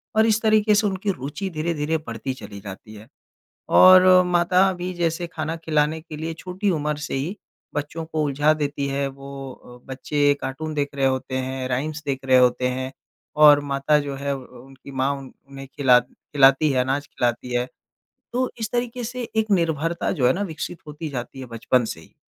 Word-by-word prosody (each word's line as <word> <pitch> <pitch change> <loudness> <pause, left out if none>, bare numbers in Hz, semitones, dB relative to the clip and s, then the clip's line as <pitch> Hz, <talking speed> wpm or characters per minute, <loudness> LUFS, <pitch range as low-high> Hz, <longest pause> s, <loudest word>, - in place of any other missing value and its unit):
और 220 +1 +5
इस 220 0 +2
तरीके 215 -1 +4
से 205 0 +3
उनकी 195 +1 -1
रुचि 150 +7 -5
धीरे-धीरे 160 -1 -1
बढ़ती 115 +3 -4
चली 105 -4 -10
जाती 100 +2 -10
है। 105 +2 -13 0.6
और 185 0 +8
अ, 185 0 +6
माता 180 +2 +3
भी 180 +1 -5
जैसे 170 0 -1
खाना 160 0 -4
खिलाने 155 -1 0
के 155 -2 -9
लिए 160 +1 -4
छोटी 185 +4 -3
उम्र 150 -2 -1
से - - -6
ही 165 +10 -3 0.4
बच्चों 150 +3 -3
को 155 -1 -2
उलझा 145 +2 +2
देती 145 -2 -2
है 140 0 -1
वो 135 0 -8
अ, 125 0 -15
बच्चे 145 +2 +1
कार्टून 155 +4 -4
देख 145 -1 -1
रहे 135 -1 +1
होते 130 0 -1
हैं, 130 0 -3
राइम्स 150 +5 -2
देख 135 -1 -1
रहे 130 -1 +5
होते 125 0 +3
हैं 130 +1 -4 0.5
और 145 -1 +8
माता 140 +2 +2
जो 140 -1 -4
है 140 +1 -3
अ, - - -2
अ, - - -5 0.3
उनकी 135 +1 -14
माँ 135 +1 0
उन 135 -1 -11 0.2
उन्हें 135 0 -9
खिला 125 -3 +5
खिलाती 135 +3 +2
है, 130 - +1
अनाज 140 +3 -1
खिलाती 125 0 -2
है। 120 +1 0 0.7
तो 255 +1 0
इस 220 - -2
तरीके 245 0 -2
से 245 +2 -5
एक 220 -1 +1
निर्भरता 165 -2 0
जो 130 -8 +1
है 130 - +5
न - - 0
विकसित 165 +1 -6
होती 150 +1 -6
जाती 135 0 -6
है 130 - -7
बचपन 115 +1 0
से 80 - -6
ही। - - -19
145 Hz, 200 wpm, -23 LUFS, 135-170 Hz, 0.7 s, और